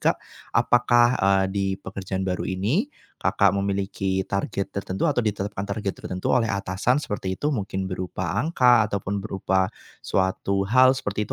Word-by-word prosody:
Kak. - - +2 0.4
Apakah, 120 0 +4
eee, 95 0 +3
di 100 -1 0
pekerjaan 95 0 -4
baru 90 -1 -1
ini, 110 - 0 0.4
Kakak 100 -1 +3
memiliki 100 -1 -1
target 100 0 -2
tertentu 100 - -1
atau 135 -5 +1
ditetapkan 100 -1 -2
target 100 -1 -3
tertentu 90 0 -4
oleh 115 -3 +2
atasan, 100 +6 0
seperti 95 -8 -4
itu. 150 - +1
Mungkin 95 -3 -3
berupa 90 -2 -3
angka 125 -8 +4
ataupun 100 0 -2
berupa 95 -2 0 0.3
suatu 95 +1 0
hal, 130 +2 +6
seperti 105 -5 -2
itu. - - -6
100 Hz, 150 wpm, -24 LUFS, 95-115 Hz, 0.4 s, hal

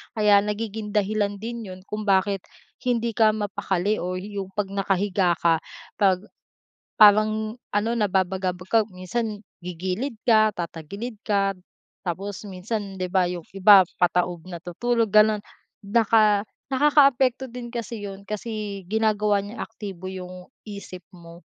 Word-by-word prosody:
Kaya 210 -2 +5
nagiging 210 0 -4
dahilan 205 0 +1
din 230 -1 -5
yun 185 - -12
kung 210 0 -4
bakit 195 0 +2 0.4
hindi 235 -2 0
ka 215 -1 +3
mapakali 205 -1 -1
o 180 +1 -3
yung 195 +1 -5
pag 200 -2 -2
nakahiga 195 -2 +1
ka 165 -1 +4 0.4
pag 190 -2 +3 0.7
parang 215 +2 +5 0.2
ano, 205 +2 +1
nababagabag 185 -2 -1
ka 225 - +5 0.2
minsan 210 +3 -3 0.2
gigilid 185 +9 -4
ka 215 -2 +4
tatagilid 190 +7 -6
ka 200 -2 +2 0.6
tapos 195 +4 -4
minsan, 200 +1 -4
di 180 -1 -2
ba 185 -1 +3
yung 175 -1 -4
iba 195 0 +8 0.2
pataob 175 -1 +1
natutulog 195 +6 -1
ganun. 215 -1 +5 0.4
Naka 215 -1 +3 0.3
nakakaapekto 265 -2 +4
din 245 -1 -7
kasi 235 -2 -5
yun 200 0 -8
kasi 210 -1 -5
ginagawa 210 -1 +2
niyang 210 +4 -8
aktibo 195 -5 -8
yung 180 -1 -8 0.2
isip 200 -4 -9
mo 170 0 -14
205 Hz, 130 wpm, -24 LUFS, 185-220 Hz, 0.7 s, iba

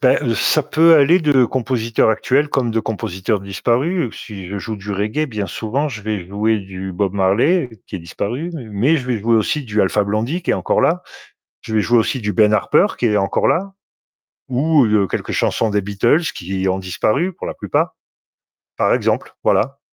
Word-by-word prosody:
Beh, 130 0 +4 0.2
ça 155 - +2
peut 160 +3 +5
aller 155 +4 +5
de 145 -5 +4
compositeur 115 -2 0
actuel 130 +7 +1
comme 130 -5 0
de 115 - 0
compositeur 105 -1 -2
disparu. 120 - -1
Si 100 -4 -9
je 100 +1 -4
joue 110 +2 -5
du 100 +1 -8
reggae, 105 +10 -1
bien 105 -6 -4
souvent, 115 - -2
je 110 -6 -7
vais 105 -4 -3
jouer 105 +3 0
du 95 -1 -7
Bob 95 +1 -1
Marley 115 - +2 0.2
qui - - -6
est - - -6
disparu, 115 - -4
mais 145 -7 -6 0.3
mais - - +4
je 125 -4 -4
vais 120 -3 -1
jouer 115 +2 +2
aussi 110 +7 0
du 110 -3 0
Alpha 105 +2 +2
Blondie 110 - -2
qui - - -1
est - - +3
encore - - 0
là. 180 +2 +2 0.6
Je 110 - -7
vais 110 - +3
jouer 120 +2 +2
aussi 130 +4 -1
du 105 -1 -1
Ben 110 -2 +4
Harper 150 - +3
qui - - -1
est 105 -2 +2
encore 95 0 +1
là 195 +3 0 0.8
ou, 140 +2 +3
heu, - - +1
de 105 -2 +3
quelques - - -4
chansons 110 - 0
des 105 - +1
Beatles 100 - +1
qui 95 +2 -4
ont 95 0 0
disparu 110 - -1
pour - - -8
la - - -4
plupart. - - -1 0.8
Par - - +2
exemple, - - -1
voilà. 135 +5 +1
110 Hz, 200 wpm, -19 LUFS, 100-140 Hz, 0.8 s, peut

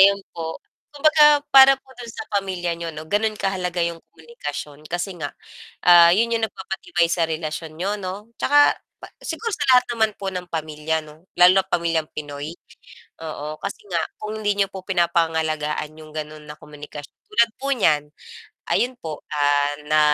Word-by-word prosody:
ayun 200 +1 +6
po, 160 -1 -5 0.3
kumbaga 300 0 +5
para 270 0 +9
po 265 0 -20
dun 235 - -8
sa 225 - -7
pamilya 185 -3 -1
niyo 170 0 -5
'no 155 +1 -7
ganon 210 +5 0
kahalaga 180 -3 -1
'yong 170 -1 -4
komunikasyon 150 -2 -8
kasi 175 +3 -3
nga, 145 -2 -5 0.5
ah, 170 -1 +9
yun 230 +5 +2
yung 225 - -1
nagpapatibay 190 - -2
sa 170 0 +1
relasyon 155 0 -4
niyo 200 +3 -1
'no. 200 +2 -6
Tsaka 290 +1 +4 0.2
pa - - -10 0.2
siguro 460 - -3
sa 290 - -2
lahat 250 0 +6
naman 220 -1 +2
po 195 - -4
ng 180 -1 -5
pamilya 155 0 -2
'no 155 +2 -16
lalo 180 +1 +9
na't 190 - -39
pamilyang 165 -2 +1
Pinoy, 145 +1 -6 0.7
oo 155 -1 -5
kasi 200 - -5
nga 175 - 0 0.2
kung 215 0 -4
hindi 205 -1 +2
niyo 200 - +3
po 190 -1 -7
pinapangalagaan 160 -4 0
'yong 155 -1 -12
gano'n 155 0 -6
na 150 - -7
komunikas 150 -1 -10 0.2
tulad 320 - +3
po 275 +1 -2
niyan 150 - +1 0.6
ayun 250 +1 +1
po, 155 -2 -6 0.2
ah, 145 0 +2 0.2
na 155 0 +5
170 Hz, 170 wpm, -22 LUFS, 155-205 Hz, 0.7 s, para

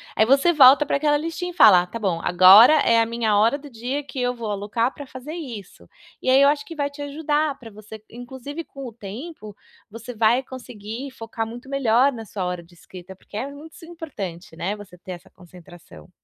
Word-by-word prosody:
aí 220 - +4
você 275 +8 +4
volta 280 -2 +7
pra 280 - -1
aquela 295 0 +1
listinha 330 +4 -4
e - - -15
fala: 195 - +6
"Tá 230 +6 -8
bom, 185 -6 -1
agora 190 - +7
é 230 0 +3
a 230 - +3
minha 225 -2 0
hora 225 +6 +3
do 290 - -12
dia 250 +4 -4
que 270 -1 -8
eu 245 0 0
vou 230 -3 -6
alocar 205 +4 -2
pra 285 - -10
fazer 260 +4 -9
isso". 235 - -9 0.4
E - - -6
aí 265 +1 +5
eu 280 - +6
acho 290 0 -1
que 330 - -10
vai 285 -2 -2
te 285 0 -9
ajudar 295 0 -2
pra 230 - -11
você 215 0 -12
inclusive 260 +6 -8
com 275 -4 -10
o - - -8
tempo, 215 - -9 0.4
você 230 +2 -9
vai 225 +3 +3
conseguir 250 0 -9
focar 225 -2 -6
muito 240 +3 -10
melhor 275 0 +2
na 225 -3 -9
sua 195 -3 -5
hora 180 -1 -4
de 170 +1 -22
escrita, 180 +2 -13
porque 205 +2 -12
é 260 - -3
muito 300 +3 -13
importante, 205 - -8
né, 185 +5 -3
você 205 -4 -13
ter 185 - -11
essa 175 - -10
concentração. 175 - -16
235 Hz, 215 wpm, -22 LUFS, 205-280 Hz, 0.4 s, volta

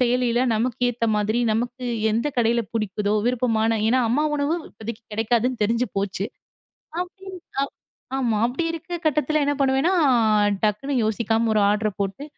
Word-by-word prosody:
செயலில 245 -1 +2
நமக்கு 240 +3 -1
ஏத்த 230 0 -3
மாதிரி, 210 +2 0
நமக்கு 245 +3 -2 0.3
எந்தக் 235 +6 -1
கடையில 235 0 +3
புடிக்குதோ 210 -1 -1
விருப்பமான, 225 -2 +1
ஏன்னா 255 +3 +3
அம்மா 270 +6 +2
உணவு 285 +3 0 0.2
இப்பதைக்கு 225 +1 -8
கிடைக்காதுன்னு 235 +1 +1
தெரிஞ்சு 230 +3 0
போச்சு. 195 0 -2 0.8
அப்படின் 375 +1 -8 0.8
ஆமா. 235 -5 +1
அப்படி 250 +7 -1
இருக்கற 340 +2 -6
கட்டத்துல 305 0 +2
என்ன 290 - +2
பண்ணுவேனா, 270 +5 +2 0.7
டக்குன்னு 215 +7 0
யோசிக்காம 225 +1 +1
ஒரு 210 - +3
ஆர்டர் 210 -1 -1
போட்டு 195 +8 -3
235 Hz, 135 wpm, -23 LUFS, 220-265 Hz, 0.8 s, கடையில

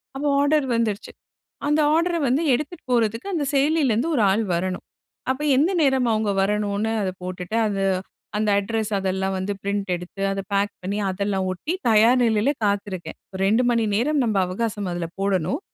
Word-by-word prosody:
அப்போ 290 +2 -2
ஆர்டர் 290 -1 +2
வந்துருச்சு. 220 -3 -1 0.6
அந்த 295 +1 +2
ஆர்டர 340 +1 +2
வந்து 265 +6 +2
எடுத்துட்டு 300 +5 -4
போறது 225 -2 +2 0.2
அந்த 300 -4 0
செயலிலேருந்து 280 -2 +2
ஒரு 225 - +3
ஆள் 215 +4 +2
வரணும். 185 +1 -2 0.5
அப்போ 280 +3 -1
எந்த 325 +8 +3
நேரம் 265 -3 +3
அவங்க 215 -1 0
வரணும்னு 210 +1 0
அத 190 - 0
போட்டுட்டு, 180 +3 -4
அது 195 -2 -1 0.6
அந்த 215 0 0
அட்ரஸ் 220 +1 -3
அதெல்லாம் 190 0 -1
வந்து 195 +2 -2
பிரிண்ட் 200 0 -2
எடுத்து, 180 +3 -8
அத 195 - -2
பேக் 200 +1 +1
பண்ணி 200 +3 -2
அதெல்லாம் 195 0 -1
ஒட்டி 300 - -4 0.2
தயார் 230 +4 +5
நிலையில 225 +5 +2
காத்திருக்கேன். 200 -3 -3 0.3
2 225 +5 +3
மணி 230 -2 +2
நேரம் 280 +4 +1
நம்ம 215 -3 0
அவகாசம் 205 0 -3
அதில 170 -1 -3
போடணும், 195 - 0
215 Hz, 160 wpm, -23 LUFS, 195-260 Hz, 0.6 s, தயார்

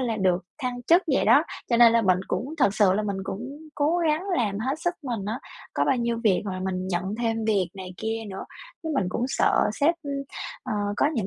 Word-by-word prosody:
là 235 -4 -1
được 185 -3 +1
thăng 245 -1 -3
chức 340 +7 +5
vậy - - +3
đó. - - +6 0.3
Cho 235 - +4
nên 235 -1 +8
là 230 - +4
mình 185 -3 +3
cũng 285 +5 -2
thực 205 -9 +3
sự 200 -4 +4
là 210 - +1
mình 200 -2 -2
cũng 195 - -4 0.3
cố 310 +4 +2
gắng 320 +1 +1
làm 205 -5 0
hết 265 +7 -2
sức 350 +1 0
mình 235 -7 -3
á, 220 +4 -2 0.4
có - - +2
bao 270 - +2
nhiêu 235 -1 -1
việc 200 -4 +3
mà 185 -2 -4
mình 185 0 -2
nhận 190 +2 -1
thêm 225 -1 -1
việc 195 -5 +1
này 185 -1 -8
kia 225 +3 -3
nữa. 190 - -6 0.4
Chứ 320 - -4
mình 195 -9 +1
cũng 230 +6 -1
sợ - - +2
sếp, 305 +4 +2 0.7
ờ, - - -4 0.2
có 285 - +3
những 215 -7 -1
225 Hz, 230 wpm, -26 LUFS, 190-255 Hz, 0.7 s, nên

